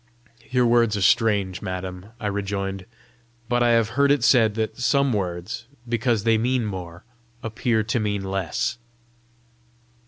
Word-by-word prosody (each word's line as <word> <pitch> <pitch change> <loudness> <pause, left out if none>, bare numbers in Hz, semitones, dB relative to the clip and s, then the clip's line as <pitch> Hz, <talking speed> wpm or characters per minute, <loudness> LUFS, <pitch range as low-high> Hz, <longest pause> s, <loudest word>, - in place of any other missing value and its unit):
"Your 125 -1 +2
words 115 -2 +3
are - - -3
strange, 100 -5 +2
madam!" 95 0 -5
I 110 - -6
rejoined. 100 -2 -3 0.6
"But 120 0 +1
I 120 - +4
have 115 -1 +3
heard 140 +5 +2
it 140 -4 +3
said 115 -3 +4
that 110 -1 -2
some 135 +1 +2
words, 90 +2 -3 0.2
because 115 -2 0
they 115 -1 +3
mean 125 0 +1
more, 90 -3 -6 0.4
appear 115 0 0
to 115 +3 -1
mean 105 -2 -1
less!" 95 +3 -2
110 Hz, 145 wpm, -23 LUFS, 95-120 Hz, 0.6 s, I